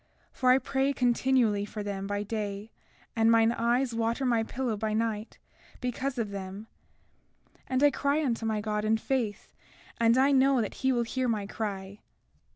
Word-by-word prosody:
For 255 - +1
I 255 - +7
pray 270 +1 0
continually 245 -4 +2
for 210 0 -6
them 195 -1 -4
by 205 0 -2
day, 210 0 -4 0.4
and 225 0 +3
mine 225 0 +5
eyes 240 +2 +1
water 230 +3 -1
my 235 -3 +2
pillow 240 0 -2
by 215 +1 -2
night, 220 0 -2 0.4
because 255 +2 -3
of 220 -4 -2
them; 195 +1 -6 1.0
and 260 +2 0
I 290 - +6
cry 285 +3 0
unto 235 -3 -1
my 220 -1 -1
God 210 0 -2
in 220 +1 +2
faith, 225 -3 -3 0.5
and 230 +1 +4
I 270 +2 +4
know 270 -1 +4
that 215 - -2
he 265 0 +3
will 240 -2 +1
hear 255 +2 -2
my 215 -4 -1
cry. 200 -1 -5
230 Hz, 170 wpm, -28 LUFS, 210-255 Hz, 1.0 s, I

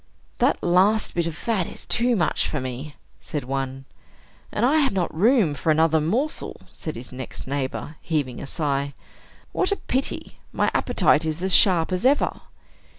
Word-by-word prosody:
"That - - +2
last 195 +5 +3
bit 170 -1 0
of 165 - -4
fat 200 -1 -1
is - - -7
too 240 +1 +2
much 175 -6 +1
for 150 - -2
me," 130 +3 -6 0.2
said 150 -3 -4
one. 135 +1 -4 0.7
"And 220 - +1
I 290 +5 +4
have 280 -6 +3
not 185 -3 -1
room 205 - +3
for 145 +3 -2
another 160 0 +4
morsel," 245 - -1
said 155 - -6
his 120 +1 -8
next 130 0 -7
neighbor, 140 +3 -4
heaving 145 -7 -2
a 140 - -6
sigh. 140 -2 -1 0.6
"What 370 - 0
a - - +3
pity! 265 -7 -3
My - - +1
appetite 155 - +3
is 160 +2 -3
as 190 -1 +1
sharp 180 -3 +5
as 180 0 -1
ever." 275 +3 +2
160 Hz, 170 wpm, -24 LUFS, 140-210 Hz, 0.7 s, sharp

